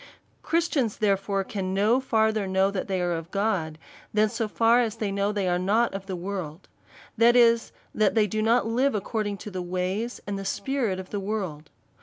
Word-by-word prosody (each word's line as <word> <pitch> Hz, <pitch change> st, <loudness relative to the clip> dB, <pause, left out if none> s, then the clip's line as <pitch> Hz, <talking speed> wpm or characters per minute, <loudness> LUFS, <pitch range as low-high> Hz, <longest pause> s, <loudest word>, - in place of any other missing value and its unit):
Christians, 320 Hz, -9 st, 0 dB
therefore, 195 Hz, -1 st, +1 dB
can 190 Hz, -1 st, -3 dB
no 215 Hz, +6 st, +3 dB
further 220 Hz, -5 st, +1 dB
know 190 Hz, +1 st, +2 dB
that 195 Hz, -2 st, -3 dB
they 190 Hz, -2 st, -1 dB
are 175 Hz, -, 0 dB
of 165 Hz, 0 st, -5 dB
God, 195 Hz, -6 st, -1 dB, 0.3 s
than 215 Hz, 0 st, +3 dB
so 225 Hz, +1 st, -2 dB
far 230 Hz, +3 st, +3 dB
as 225 Hz, -2 st, -1 dB
they 215 Hz, -3 st, -2 dB
know 200 Hz, 0 st, 0 dB
that 210 Hz, -, -2 dB
they 195 Hz, -2 st, 0 dB
are 175 Hz, 0 st, +1 dB
not 215 Hz, +6 st, +2 dB
of 195 Hz, 0 st, -6 dB
the 190 Hz, -, -3 dB
world; 180 Hz, -3 st, -6 dB, 0.5 s
that 235 Hz, +2 st, +5 dB
is, 235 Hz, -1 st, +4 dB, 0.2 s
that 215 Hz, -1 st, +2 dB
they 220 Hz, -2 st, +4 dB
do 215 Hz, +1 st, -2 dB
not 230 Hz, +2 st, +3 dB
live 245 Hz, +3 st, +1 dB
according 210 Hz, 0 st, -2 dB
to 210 Hz, -, -8 dB
the 185 Hz, -1 st, -4 dB
ways 185 Hz, +6 st, -3 dB
and 200 Hz, -1 st, -4 dB
spirit 245 Hz, -5 st, -1 dB
of 185 Hz, -, -9 dB
the 205 Hz, -, -2 dB
world. 190 Hz, -7 st, -4 dB
205 Hz, 200 wpm, -26 LUFS, 190-225 Hz, 0.5 s, that